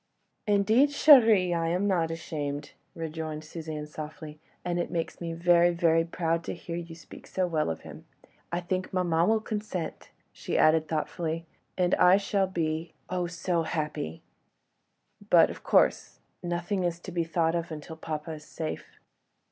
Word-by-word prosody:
"Indeed, 215 +7 +4
chérie, 225 - +6
I 165 -1 0
am 180 +4 0
not 175 -5 +1
ashamed," 150 -3 -4 0.2
rejoined 160 -1 -5
Suzanne, 155 -1 -6
softly; 150 0 -8 0.3
"and 175 0 -1
it 175 - -2
makes 170 -1 -3
me 170 -1 -3
very, 175 +1 +4
very 165 -1 +3
proud 165 0 -1
to - - -4
hear 170 0 -6
you 170 -1 -6
speak 160 - -13
so 185 - 0
well 160 - 0
of 80 - -4
him. - - -11 0.5
I 175 +1 -1
think 185 +1 -3
maman 175 -1 +2
will 220 0 +3
consent," 210 -6 -5 0.2
she - - -3
added 155 0 +4
thoughtfully, 165 +1 -2 0.3
"and 180 -1 +2
I 180 +1 +6
shall 200 -1 0
be—oh! 170 +1 -3
so 170 0 -1
happy—but, 150 - -2
of - - -11
course, - - +2 0.2
nothing 175 +3 -2
is 170 -1 -1
to 185 - -8
be 170 -1 0
thought 165 0 +1
of 170 0 -2
until 155 +1 -7
papa 155 0 -5
is 155 -1 -8
safe. 160 0 -6
170 Hz, 155 wpm, -28 LUFS, 160-180 Hz, 0.5 s, chérie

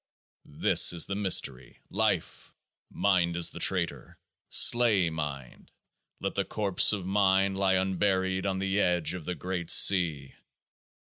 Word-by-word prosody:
This 75 - +3
is 85 - +2
the 100 - -5
mystery. 90 -10 -1
Life! - - -3 0.3
Mind 85 -4 -1
is 85 -1 +1
the - - -10
traitor. - - -3 0.3
Slay 110 -8 +3
mind. 75 -5 -8 0.5
Let - - -4
the - - -2
corpse 100 -4 +1
of 100 -4 -4
mind 95 0 +1
lie 95 -1 0
unburied 95 0 -1
on 95 -1 -3
the 95 +1 -2
edge 90 -4 0
of 90 -4 -8
the 90 - -5
Great 90 -2 -6
Sea 80 -8 +3
95 Hz, 135 wpm, -27 LUFS, 85-95 Hz, 0.5 s, This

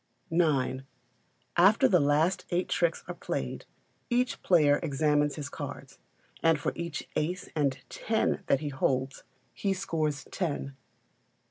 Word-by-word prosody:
ix. 135 -6 +1 0.7
After 195 +5 +6
the 180 - +4
last 150 +5 +2
eight 180 0 0
tricks 170 -2 +1
are - - -4
played, - - -4 0.4
each 250 +1 0
player 150 -5 +4
examines 150 -1 +1
his 145 -2 -5
cards, - - -8 0.4
and 165 -2 +4
for - - -1
each 170 -2 -5
ace 180 +4 -2
and 140 -3 +1
ten 220 -1 0
that 140 - +2
he 150 - -2
holds 135 0 -1 0.3
he 195 -1 0
scores 155 -6 -2
ten. 145 -6 -3
155 Hz, 130 wpm, -29 LUFS, 145-175 Hz, 0.7 s, After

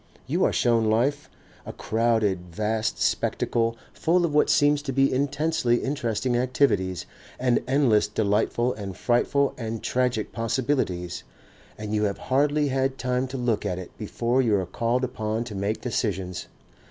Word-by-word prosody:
You - - 0
are - - +2
shown 115 -2 +2
life, 135 +7 +1 0.3
a - - -7
crowded 110 -5 0
vast 110 +4 -1
spectacle 115 0 0 0.2
full 175 +2 +2
of 155 - -2
what 150 - +3
seems 145 0 +4
to 145 -2 -4
be 135 +1 +2
intensely 140 -2 +1
interesting 125 -3 -1
activities 120 - +1 0.3
and 125 -1 +2
endless 130 -6 +3
delightful 110 +4 +1
and 100 -3 -7
frightful 140 +3 +1
and 115 -2 -4
tragic 125 -4 0
possibilities, 115 -7 -1 0.5
and 105 0 -5
you 105 0 +2
have 100 -1 -1
hardly 145 +2 +1
had 135 0 0
time 125 +1 -1
to 130 +1 -5
look 120 -4 0
at 95 -4 -2
it 95 - -9
before 120 +3 0
you 115 -5 +2
are 95 -2 0
called 115 +7 -1
upon 110 -3 -2
to 120 -3 -8
make 100 +2 -2
decisions. 95 -7 -2
120 Hz, 155 wpm, -25 LUFS, 105-130 Hz, 0.5 s, seems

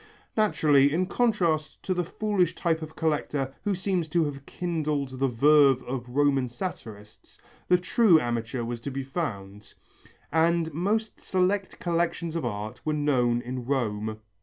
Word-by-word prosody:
Naturally, 150 -10 +4
in 175 +5 +1
contrast 180 -9 0
to 185 - 0
the 180 -1 0
foolish 185 -1 0
type 165 -2 0
of 155 0 -8
collector 145 -4 -1
who 205 -1 0
seems 185 -3 -1
to 170 0 +2
have 140 -1 -6
kindled 150 -6 -2
the 135 - +2
verve 135 +1 +4
of 125 -1 -5
Roman 135 -1 +2
satirists, 110 - -8 0.3
the 180 - +5
true 185 -1 +4
amateur 120 -1 -2
was 115 0 -4
to 140 - -4
be 135 0 -4
found, 105 - -5 0.6
and 165 0 +2
most 210 +7 -1
select 190 +1 0
collections 170 -1 -1
of 165 - -2
art 110 -2 -5
were 155 - 0
known 125 -5 +1
in 125 0 -5
Rome. 110 -5 -2
150 Hz, 150 wpm, -27 LUFS, 125-175 Hz, 0.6 s, the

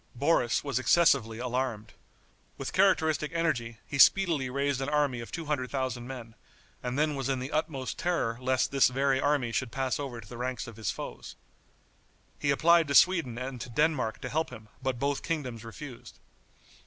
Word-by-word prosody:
Boris 125 -3 +2
was 140 -3 -1
excessively 130 -7 +3
alarmed. 125 -3 -3 0.6
With - - -5
characteristic 160 -6 +3
energy 120 -9 -1
he 140 - -5
speedily 165 -7 +5
raised 140 0 -1
an 135 - -2
army 145 -5 +1
of 115 - -8
two 165 -2 -5
hundred 140 -4 -1
thousand 130 -3 -3
men, 120 -4 -8 0.5
and 125 +1 -3
then 150 0 +2
was 135 -2 -3
in 135 - +1
the 130 +2 -5
utmost 150 -4 -2
terror 165 -10 0
lest 130 0 +1
this 135 -1 +5
very 135 +1 +1
army 145 -4 +1
should 115 +1 -2
pass 130 +2 -1
over 135 -5 -5
to 105 - -12
the 120 +2 -9
ranks 125 -1 -3
of 115 -2 -11
his 110 -5 -2
foes. - - -6 1.0
He 145 - -1
applied 165 +3 +4
to 140 - -1
Sweden 165 -11 +4
and 130 -1 -5
to 125 - -6
Denmark 150 -3 0
to 130 - -4
help 160 +5 -1
him, 110 -4 -12
but 130 -1 -1
both 140 +2 -1
kingdoms 130 -9 -3
refused. 125 +2 -10
135 Hz, 180 wpm, -29 LUFS, 120-150 Hz, 1.0 s, speedily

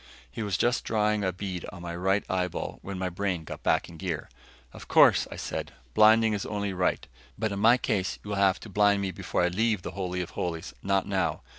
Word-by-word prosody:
He - - -6
was 100 -4 -1
just 120 +1 +1
drawing 105 -1 +1
a 95 - +1
bead 90 -1 -5
on 90 -4 -10
my 85 -1 -5
right 95 +3 +1
eyeball 90 -2 -2
when 100 -1 -6
my 95 0 -1
brain 90 -1 -2
got - - -8
back - - +1
in 85 - -12
gear. 85 -3 -4 0.4
"Of - - -11
course," - - +6
I - - -7
said, - - -5 0.2
"blinding 110 - +6
is 100 - -2
only 100 -2 -3
right. 90 0 0 0.3
But 110 -2 -1
in 100 - -3
my 115 +4 +6
case 105 -7 -1
you 105 - -9
will 100 - -2
have 95 -2 +3
to - - -9
blind 100 0 +3
me 95 - -1
before 90 - -1
I 90 - +3
leave 105 +1 0
the - - -5
Holy 90 -2 -3
of 90 - -6
Holies, 80 -8 -4
not 100 0 +1
now. 95 -3 -1
95 Hz, 230 wpm, -28 LUFS, 90-105 Hz, 0.4 s, course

